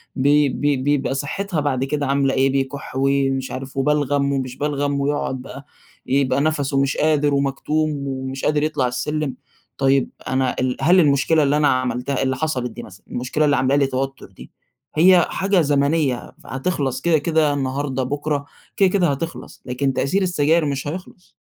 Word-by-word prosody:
بي 145 +1 +3
بي 145 0 0
بيبقى 135 0 0
صحتها 160 +5 -3
بعد 135 -3 0
كده 145 +1 -1
عاملة 135 0 +1
إيه، 135 0 +3
بيكح 135 +1 -3
ومش 135 -1 +1
عارف 135 +1 -7
وبلغم 145 0 +1
ومش 130 -2 -3
بلغم 145 -1 -1
ويقعد 140 -2 -1
بقى، 140 +2 -10 0.4
يبقى 135 0 +1
نفَسُه 145 -2 +1
مش 140 0 0
قادر 150 -2 +2
ومكتوم 140 +1 -1
ومش 130 0 -4
قادر 150 0 +2
يطلع 150 -5 0
السلم، 145 +3 -2 0.4
طيب 135 -1 +2 0.2
أنا 130 -1 0
ال 130 0 -1
هل 180 +3 +5
المشكلة 150 +1 +3
اللي 145 +1 +2
أنا 150 -1 +3
عملتها 130 +1 0
اللي 130 0 0
حصلت 130 -5 -2
دي 120 +2 -9
مثلًا، 95 - -14
المشكلة 130 +5 -1
اللي 145 -1 +3
عاملة 130 +1 +2
لي 140 -1 +3
توتر 135 +1 -3
دي، - - -14 0.4
هي 175 +2 +6
حاجة 195 -2 +1
زمنية 140 -2 +1
فهتخلص 135 -1 -2
كده، 170 -2 +3
كده 155 -1 +1
النهارده، 135 -1 -2
بُكرة، 145 +2 -2 0.3
كده 195 -2 +5
كده 185 -2 +2
هتخلص، 165 +4 -6
لكن 135 +2 -1
تأثير 185 +10 0
السجاير 165 -2 +2
مش 140 -1 -3
هيخلص. 180 +2 -8
140 Hz, 165 wpm, -21 LUFS, 135-150 Hz, 0.4 s, هي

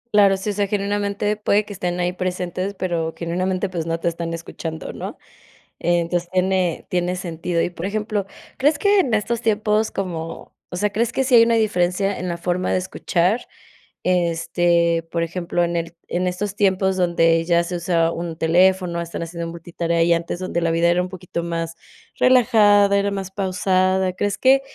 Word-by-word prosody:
Claro, 200 -2 +6
sí. 205 +2 -3
O - - -4
sea, 200 0 0
genuinamente, 205 +1 -1
puede 210 0 +2
que 205 - -8
estén 180 -1 -3
ahí 180 0 0
presentes, 185 +1 -3
pero, 170 -3 -2
genuinamente, 185 +3 -1
pues, 170 -3 -4
no 165 0 -1
te - - -2
están 170 0 -2
escuchando, 165 -1 -6
¿no? - - -7 0.6
Entonces, 175 0 0
tiene 185 -2 0
tiene 180 0 0
sentido. 170 -1 -2
Y, 175 - -2
por 175 +2 -5
ejemplo, 210 -1 -2 0.3
¿crees 290 +3 +3
que 405 +2 +3
en 250 -11 +2
estos 225 +2 -1
tiempos, 215 -1 +1
como? 165 -4 -5
O - - -6
sea, 205 +3 0
¿crees 230 +3 0
que 265 - +1
sí 260 - -1
hay 235 - +9
una 230 0 +4
diferencia, 195 -2 +1
en 180 - -3
la 170 -1 -2
forma 180 +1 -1
de - - +2
escuchar? 185 +2 0 0.6
Este, 170 -1 +2
por 170 -1 0
ejemplo, 175 +1 -2
en 170 0 -1
el 170 0 -3
En 180 +1 -1
estos 190 +2 -3
tiempos, 190 -2 +2
donde 165 -2 +3
ya 170 0 +3
se 175 +1 -4
usa 170 -1 +1
un 170 -1 -5
teléfono, 175 +1 +2
están 170 0 -5
haciendo 170 0 -5
multitarea. 170 0 -1
Y 170 0 +4
antes, 170 +1 -2
donde 185 -2 -2
la 165 -1 +1
vida, 170 +1 +2
era 175 +1 +3
un 180 - -4
poquito 180 -2 -5
más 165 -1 -3 0.4
relajada, 210 -5 +5
era 200 0 +1
más 195 -1 -4
pausada. 190 -1 +1
¿Crees 205 +2 -1
que 270 +1 +5
180 Hz, 185 wpm, -21 LUFS, 170-200 Hz, 0.6 s, hay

